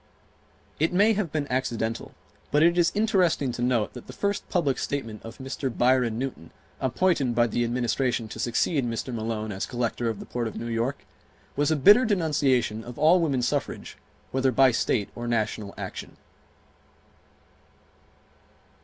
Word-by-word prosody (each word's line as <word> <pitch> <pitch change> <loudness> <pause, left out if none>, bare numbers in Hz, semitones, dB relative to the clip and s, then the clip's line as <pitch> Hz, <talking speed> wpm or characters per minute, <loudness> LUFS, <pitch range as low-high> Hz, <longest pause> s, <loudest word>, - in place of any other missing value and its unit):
It 160 +2 +2
may 205 +5 +5
have 195 -7 -2
been 150 -2 -1
accidental 115 -3 -2 0.3
but 150 +3 +3
it 170 +1 +5
is 175 -1 +3
interesting 185 - +2
to 120 - -6
note 120 -3 +1
that 125 - -10
the - - -9
first 200 0 -2
public 150 -7 +1
statement 115 -7 -4
of 115 0 -10
Mr. 135 0 -4
Byron 125 -2 +2
Newton, 125 -11 -5 0.3
appointed 135 -2 +1
by 120 0 +4
the 120 0 0
Administration 120 0 0
to 110 - -8
succeed 125 +5 +1
Mr. 120 +2 -3
Malone 110 -1 -3
as 95 -1 -4
Collector 120 -1 -2
of 110 - -4
the - - -8
Port 120 -1 -3
of 110 - -7
New - - -5
York, 120 +4 -2 0.5
was 145 +2 +1
a 160 - +3
bitter 205 - +7
denunciation 145 - +1
of 120 0 -9
all 165 +4 +5
woman 140 -7 0
suffrage - - -2 0.4
whether 130 0 +2
by 130 +1 +5
state 110 -2 0
or 120 0 -6
national 110 -3 -1
action. - - -7
125 Hz, 160 wpm, -26 LUFS, 115-150 Hz, 0.5 s, bitter